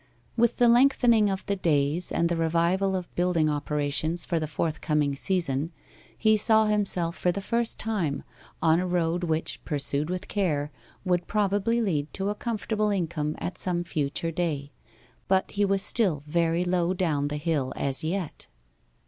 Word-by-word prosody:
With 235 Hz, 0 st, +2 dB
the 240 Hz, -, +5 dB
lengthening 235 Hz, -3 st, +4 dB
of 190 Hz, 0 st, -3 dB
the 200 Hz, -, -1 dB
days, 160 Hz, -1 st, +1 dB
and 170 Hz, -, +1 dB
the 170 Hz, -, -1 dB
revival 170 Hz, +4 st, +1 dB
of 180 Hz, -2 st, -5 dB
building 175 Hz, -3 st, +1 dB
operations 150 Hz, +2 st, 0 dB
for 170 Hz, -3 st, 0 dB
the 155 Hz, -, -3 dB
forthcoming 150 Hz, -1 st, -1 dB
season, 165 Hz, -3 st, 0 dB, 0.5 s
he 220 Hz, -1 st, +3 dB
saw 220 Hz, +1 st, +4 dB
himself, 195 Hz, -5 st, +1 dB
for 180 Hz, -, +1 dB
the 200 Hz, -, -4 dB
first 230 Hz, +3 st, 0 dB
time, 185 Hz, -11 st, -2 dB, 0.4 s
on 160 Hz, 0 st, +4 dB
a 180 Hz, -, -1 dB
road 175 Hz, 0 st, 0 dB
which, 160 Hz, -1 st, -2 dB
pursued 145 Hz, +1 st, -1 dB
with 185 Hz, +2 st, -4 dB
care, 150 Hz, -8 st, -1 dB, 0.3 s
would 180 Hz, -1 st, 0 dB
probably 210 Hz, +3 st, +1 dB
lead 155 Hz, -7 st, -1 dB
to 195 Hz, +1 st, -1 dB
a -, -, 0 dB
comfortable 215 Hz, -1 st, -2 dB
income 165 Hz, -6 st, -2 dB
at 180 Hz, -, -5 dB
some 175 Hz, -2 st, -1 dB
future 155 Hz, 0 st, -2 dB
day. 155 Hz, -4 st, -2 dB, 0.6 s
But 190 Hz, 0 st, +1 dB
he 205 Hz, 0 st, +1 dB
was 195 Hz, 0 st, +1 dB
still 180 Hz, -, 0 dB
very 170 Hz, +2 st, +1 dB
low 180 Hz, 0 st, 0 dB
down 155 Hz, -6 st, 0 dB
the 150 Hz, +1 st, -3 dB
hill 145 Hz, -4 st, -1 dB
as 140 Hz, +3 st, 0 dB
yet. 170 Hz, 0 st, -4 dB
175 Hz, 165 wpm, -26 LUFS, 155-195 Hz, 0.6 s, the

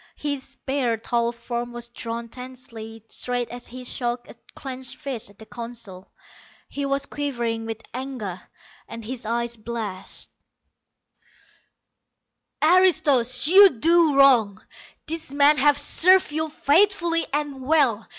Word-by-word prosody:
His 285 Hz, -2 st, -3 dB
spare, 265 Hz, -3 st, -2 dB
tall 235 Hz, +1 st, -1 dB
form 240 Hz, 0 st, -5 dB
was 240 Hz, 0 st, -6 dB
drawn 235 Hz, 0 st, -6 dB
tensely 230 Hz, -3 st, -10 dB
straight 245 Hz, 0 st, -3 dB
as 245 Hz, 0 st, -9 dB
he 255 Hz, +1 st, -9 dB
shook 240 Hz, -1 st, -2 dB
a -, -, -12 dB, 0.2 s
clenched 260 Hz, -2 st, -6 dB
fist 255 Hz, -7 st, -4 dB
at 200 Hz, -, -20 dB
the 220 Hz, -, -13 dB
Council. 230 Hz, -6 st, -9 dB, 0.6 s
He 280 Hz, 0 st, -3 dB
was 275 Hz, 0 st, -1 dB
quivering 235 Hz, -6 st, -3 dB
with 225 Hz, 0 st, -6 dB
anger, 245 Hz, -8 st, -5 dB, 0.5 s
and 230 Hz, -1 st, -8 dB
his 245 Hz, -1 st, -6 dB
eyes 235 Hz, +1 st, -1 dB
blazed. 215 Hz, -4 st, -5 dB, 2.3 s
"Aristos, 295 Hz, -8 st, +4 dB
you 380 Hz, -, +8 dB
do 330 Hz, +2 st, +4 dB
wrong! 225 Hz, -7 st, +4 dB, 0.4 s
These 315 Hz, -3 st, -6 dB
men 290 Hz, +1 st, +5 dB
have 290 Hz, +1 st, +4 dB
served 370 Hz, +4 st, +4 dB
you 315 Hz, +1 st, -2 dB
faithfully 335 Hz, +2 st, +2 dB
and 290 Hz, -2 st, -3 dB
well. 260 Hz, -6 st, +1 dB
250 Hz, 125 wpm, -23 LUFS, 230-285 Hz, 2.3 s, you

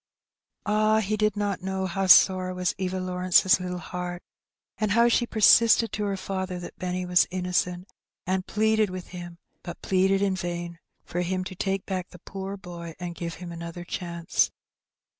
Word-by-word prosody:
Ah! 215 Hz, +1 st, +3 dB
he 215 Hz, 0 st, -1 dB
did 215 Hz, -1 st, +1 dB
not 205 Hz, -3 st, -1 dB
know 190 Hz, 0 st, -2 dB
how 190 Hz, +1 st, -1 dB
sore 185 Hz, +1 st, +6 dB
was 180 Hz, 0 st, 0 dB
Eva 185 Hz, 0 st, -2 dB
Lawrence's 185 Hz, 0 st, +3 dB
little 180 Hz, 0 st, -4 dB
heart, 175 Hz, 0 st, -6 dB, 0.6 s
and 215 Hz, -2 st, +1 dB
how 235 Hz, +2 st, +5 dB
she 240 Hz, 0 st, +2 dB
persisted 230 Hz, +1 st, +5 dB
to 210 Hz, -, -2 dB
her 200 Hz, -1 st, -2 dB
father 190 Hz, -1 st, -4 dB
that 175 Hz, -, -9 dB
Benny 180 Hz, 0 st, -2 dB
was 180 Hz, 0 st, +4 dB
innocent, 180 Hz, 0 st, -1 dB, 0.4 s
and 185 Hz, 0 st, -1 dB
pleaded 220 Hz, -1 st, +2 dB
with 185 Hz, -1 st, -7 dB
him, 175 Hz, -1 st, -8 dB, 0.2 s
but 175 Hz, -, -9 dB
pleaded 195 Hz, +1 st, +2 dB
in 195 Hz, -1 st, +1 dB
vain, 175 Hz, -2 st, -5 dB, 0.3 s
for 175 Hz, -, -3 dB
him 185 Hz, +1 st, -1 dB
to 185 Hz, -, -7 dB
take 195 Hz, +1 st, -2 dB
back 185 Hz, -2 st, -4 dB
the -, -, -13 dB
poor 195 Hz, +1 st, -6 dB
boy 170 Hz, -3 st, -9 dB
and 175 Hz, -1 st, -5 dB
give 170 Hz, -1 st, -5 dB
him 175 Hz, 0 st, -8 dB
another 170 Hz, +1 st, -7 dB
chance. 170 Hz, -1 st, -1 dB
185 Hz, 175 wpm, -26 LUFS, 175-195 Hz, 0.6 s, sore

